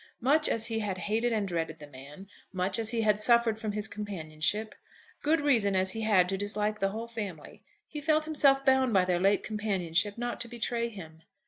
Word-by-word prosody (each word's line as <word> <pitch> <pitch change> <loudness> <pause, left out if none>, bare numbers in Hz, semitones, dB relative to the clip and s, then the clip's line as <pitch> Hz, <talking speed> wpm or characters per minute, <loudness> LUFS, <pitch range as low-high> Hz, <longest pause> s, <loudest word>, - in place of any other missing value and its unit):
Much 295 +6 +3
as 225 0 0
he 225 -1 -1
had 200 -3 -3
hated 220 +5 0
and 215 -3 0
dreaded 165 -3 -3
the 150 - -10
man; 145 +6 -12 0.3
much 185 +2 -1
as 220 -1 -2
he 230 -1 0
had 210 -1 +2
suffered 235 0 +3
from 215 -2 -3
his 210 +1 -3
companionship, 205 +1 -3 0.5
good 315 +2 +2
reason 230 -9 +2
as 190 0 +2
he 225 - -3
had 205 -5 +3
to 195 - -1
dislike 210 +1 -2
the 195 - +1
whole 225 +3 -5
family, 205 -9 -7 0.2
he 300 - -7
felt 310 +1 +2
himself 275 -3 +3
bound 265 -3 +3
by 185 -2 +4
their 180 -1 +1
late 195 +2 +2
companionship 205 -2 -1
not 240 0 -4
to 240 - -4
betray 235 0 -2
him. 160 -7 -11
210 Hz, 205 wpm, -29 LUFS, 190-235 Hz, 0.5 s, by